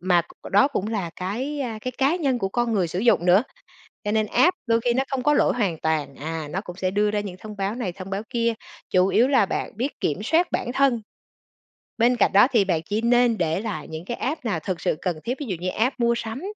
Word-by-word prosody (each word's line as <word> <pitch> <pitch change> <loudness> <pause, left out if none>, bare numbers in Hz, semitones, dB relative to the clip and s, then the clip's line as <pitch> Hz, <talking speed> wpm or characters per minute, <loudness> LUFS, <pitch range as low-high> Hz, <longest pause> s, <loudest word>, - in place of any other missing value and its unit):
mà 175 -1 +3
c 170 - -14
đó 235 +8 +5
cũng 210 -8 -2
là 200 -7 -2
cái, 250 +11 -3
à, 235 -5 -3
cái 255 +3 -4
cá 275 +5 +3
nhân 275 -8 0
của 195 -4 -1
con 240 +3 0
người 190 -5 +1
sử 175 - -4
dụng 230 -6 +3
nữa. 185 +4 +6 0.6
Cho 205 - -1
nên 215 0 +2
app 360 - +3
đôi 230 -1 +3
khi 240 +1 +1
nó 265 +2 +1
không 270 -2 -2
có 295 +3 +3
lỗi - - +3
hoàn 195 -9 0
toàn. 155 -3 -1
À, 160 +1 -5
nó 185 - -2
cũng 180 -4 -9
sẽ 185 0 -1
đưa 210 +2 +1
ra 210 0 0
những 195 -3 -6
thông 210 +1 -9
báo 200 +1 -2
này, 230 -7 -3
thông 190 +1 -9
báo 195 +1 -2
kia, 235 -2 +1 0.4
chủ 185 0 +4
yếu 240 +6 +4
là 270 -7 +4
bạn - - -4
biết 255 +6 -3
kiểm 160 +6 -1
soát 325 +10 +2
bản 245 - -2
thân. 265 -5 +2 1.0
Bên 240 +2 +4
cạnh 240 - +3
đó 205 +5 +7
thì 220 -6 +4
bạn 170 -4 0
chỉ 210 +4 -1
nên 240 -1 +3
để 160 -1 0
lại 155 -9 -5
những 160 +2 -7
cái 240 - -4
app 280 0 -3
nào 205 -7 0
thực 175 +2 -4
sự - - +1
cần 175 -4 -2
thiết. 250 +2 -2
Ví 290 - -4
dụ 195 -7 -2
như 180 +1 -2
app 245 +7 0
mua 235 0 +3
sắm, 225 +3 -5
215 Hz, 260 wpm, -24 LUFS, 185-245 Hz, 1.0 s, đó